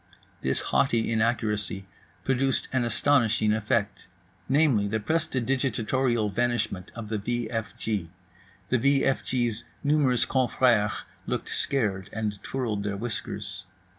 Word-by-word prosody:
This 65 - +1
haughty 110 - +1
inaccuracy 110 -3 0 0.4
produced 135 0 +1
an 130 -2 +2
astonishing 115 -3 +3
effect, 105 -1 -1 0.4
namely, 135 -8 +4
the 110 +2 0
prestidigitatorial 130 -4 0
vanishment 120 -5 -1
of 115 -2 -6
the 110 -1 -1
v 120 +2 -2
f 115 -2 -3
g. 100 -7 -2 0.6
The 130 - +3
v 140 +3 +3
f 135 - +1
g's 120 -3 -1 0.2
numerous 145 -4 +3
confrères 120 -4 +2 0.2
looked - - -2
scared 105 -8 -1
and 105 -2 -3
twirled 115 -6 -2
their 100 -1 -2
whiskers. 105 -2 -4
115 Hz, 120 wpm, -27 LUFS, 105-130 Hz, 0.6 s, namely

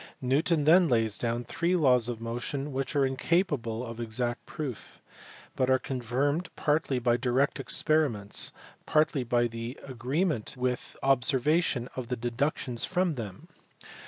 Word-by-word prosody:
Newton 150 +5 +2
then 170 +3 +6
lays 115 -3 +1
down 120 0 -1
three 170 +8 0
laws 125 -7 +4
of 120 -2 -4
motion 120 +5 -4
which 135 +2 -3
are 140 -1 +4
incapable 130 - 0
of 115 -1 -8
exact 120 +1 -2
proof, 140 -8 -6 0.6
but 130 0 +1
are 130 - +5
confirmed 135 +5 -1
partly 145 -3 +1
by 120 -1 +2
direct 130 +3 +1
experiments, 135 -11 +1 0.4
partly 155 -3 +2
by 120 0 +2
the 115 +2 -5
agreement 130 - -1
with 125 -1 -2
observation 135 +1 +2
of 130 -2 -4
the 125 0 -2
deductions 120 +1 -2
from 180 -2 +1
them. 105 -8 -7
130 Hz, 135 wpm, -29 LUFS, 120-150 Hz, 0.6 s, then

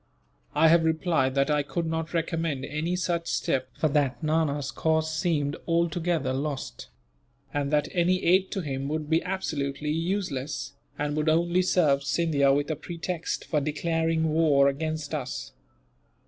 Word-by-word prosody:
I 160 +2 +6
have 165 0 +5
replied 160 -5 +1
that 140 +2 +2
I 150 0 +3
could 165 +4 -3
not 160 0 -2
recommend 165 -4 -1
any 155 +5 -2
such 175 -2 -1
step, 130 -1 -1
for 155 - +2
that 145 0 0
Nana's 150 -3 0
cause 160 0 0
seemed 155 -4 0
altogether 170 -4 0
lost; 140 0 -4 0.7
and 145 -1 -1
that 150 0 +2
any 180 0 +1
aid 185 +2 +4
to 195 - -2
him 135 -3 -3
would 155 +1 -3
be 160 - +4
absolutely 150 -6 -2
useless, 150 -5 -2 0.2
and 145 0 -1
would 155 +1 +1
only 170 +3 +3
serve 155 -7 +2
Scindia 140 -2 +2
with 145 +3 +1
a - - -1
pretext 170 +2 -4
for 150 - 0
declaring 160 +1 0
war 150 -4 +4
against 155 +2 -2
us. 135 -4 -4
155 Hz, 150 wpm, -27 LUFS, 145-165 Hz, 0.7 s, I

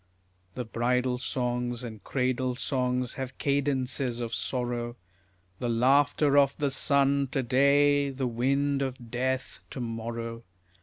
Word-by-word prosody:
The 125 - -3
bridal 125 +2 0
songs 125 -1 -2
and 110 -5 -8
cradle 130 -1 0
songs 125 -1 -1
have 130 -1 -6
cadences 135 -3 0
of 115 -1 -4
sorrow, 120 -2 -2 0.6
The 120 - -1
laughter 140 +4 +4
of 140 -1 +2
the 145 -2 0
sun 140 0 +2
to 135 - +1
day, 140 +3 +4
the 135 -1 -3
wind 140 +4 +1
of 130 -3 -4
death 130 +1 -2
to - - -7
morrow. 115 0 -4
125 Hz, 125 wpm, -28 LUFS, 120-140 Hz, 0.6 s, laughter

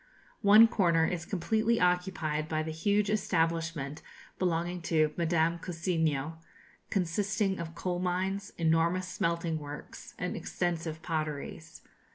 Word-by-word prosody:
One 215 +2 +8
corner 170 -7 +3
is 170 0 -2
completely 220 +5 +1
occupied 180 -4 0
by 155 0 0
the 160 - -4
huge 200 +6 +1
establishment 165 -6 0 0.4
belonging 175 0 0
to 155 -2 +3
Madame 170 0 +1
Cousiño, 160 -4 -1 0.5
consisting 195 +2 0
of 165 0 -6
coal 180 0 -2
mines, 190 +3 -1
enormous 170 +3 +2
smelting 170 -2 -1
works, 145 0 -9
and - - -3
extensive 165 -2 -3
potteries. 155 0 -4
170 Hz, 115 wpm, -30 LUFS, 160-185 Hz, 0.5 s, One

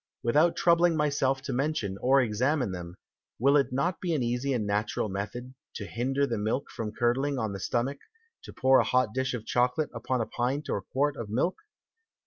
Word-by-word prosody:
Without 150 +8 +3
troubling 170 -2 +3
myself 135 -3 +1
to 135 - -3
mention 130 -7 -1
or 135 +2 +5
examine 125 +2 0
them, 90 -1 -7 0.4
will 140 +4 +4
it 140 -3 +3
not 150 +7 -1
be 175 -3 0
an 135 - 0
easy 125 +3 -1
and 120 -5 0
natural 105 +1 -1
Method, 115 +6 -5 0.2
to 100 - -5
hinder 135 +6 0
the 115 -5 -2
Milk 110 +6 -2
from 110 -2 -4
curdling 125 +5 0
on 110 -5 -2
the 100 - -5
Stomach, 125 +8 -1 0.4
to - - -10
pour 130 0 +4
a - - +4
hot 125 -4 +1
Dish 130 -1 -1
of 110 -2 -7
Chocolate 125 +6 +1
upon 120 +2 -2
a 115 - 0
Pint 130 +7 -2
or 100 - -1
Quart 145 +8 -1
of 115 -3 -6
Milk? 135 - 0
125 Hz, 195 wpm, -28 LUFS, 115-140 Hz, 0.4 s, or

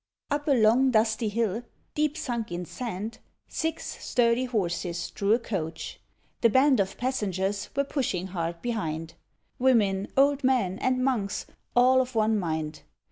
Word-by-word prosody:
Up 290 +1 -1
a 285 - +5
long 240 +2 +5
dusty 220 -1 +2
hill, 220 0 0 0.3
deep 300 0 0
sunk 235 - -3
in 175 +1 -3
sand, 220 0 -5 0.3
Six 320 0 -4
sturdy 240 +1 +2
horses 175 -6 -2
drew 200 +1 +1
a - - +5
Coach. 170 -9 -5 0.4
The 230 - +6
band 260 +1 +4
Of 195 0 0
passengers 200 -6 -1
were 280 - +2
pushing 250 - -2
hard 170 -1 -3
behind: 165 -9 -3 0.5
Women, 205 -7 +3
old 280 +1 +4
men, 240 -8 +2
and 255 0 +1
monks, 220 -7 -1 0.3
all 255 +1 +6
of 255 -1 -5
one 220 -1 +3
mind. 160 -3 -3
225 Hz, 145 wpm, -27 LUFS, 190-255 Hz, 0.5 s, The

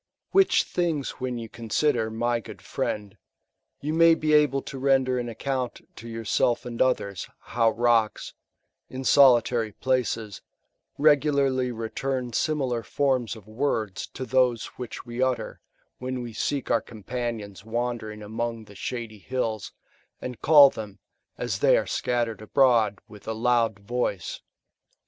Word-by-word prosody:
Which 390 -1 +4
things 165 -6 -1
when 125 -1 -3
you 115 -1 -6
consider, 115 +1 0
my 120 +2 0
good - - -11
friend, 105 -2 -3 0.7
yon 155 +3 -2
may 165 0 +7
be 155 -1 0
able 145 -3 +4
to 135 - -7
render 130 -2 +2
an 120 -1 -3
account 130 +1 -3 0.2
to 115 - -9
yourself 115 +1 0
and 120 -1 -4
others, 100 -9 0
how 115 -1 +1
rocksi 115 -2 +1 0.6
in 130 +1 -6
solitary 120 -5 +5
places, 115 -5 -1 0.6
regularly 140 -3 +3
return 120 +2 -3
similar 135 -5 0
forms 130 -2 0
of 110 -3 -13
words 110 -4 -2
to 130 - -4
those 125 -3 +2
which 125 -2 -6
toe 120 +1 -2
utter, 120 -3 -5 0.4
when 130 0 -4
we 120 -2 -7
seek 135 +4 -2
our 115 - +3
companions 110 -3 -5
wandering 115 -2 -3
among 115 +1 -3
the 105 - -14
shady 115 0 -5
hills, 115 -2 -3 0.5
and 125 -2 -7
call 145 -2 +8
them, 105 -2 -8 0.4
as - - -2
they - - +5
are - - 0
scattered 120 -3 -1
abroad, 115 -3 +3
with 105 0 -14
a 110 - -1
loud 115 -1 +1
voice. 100 -3 -3
120 Hz, 140 wpm, -26 LUFS, 110-130 Hz, 0.7 s, call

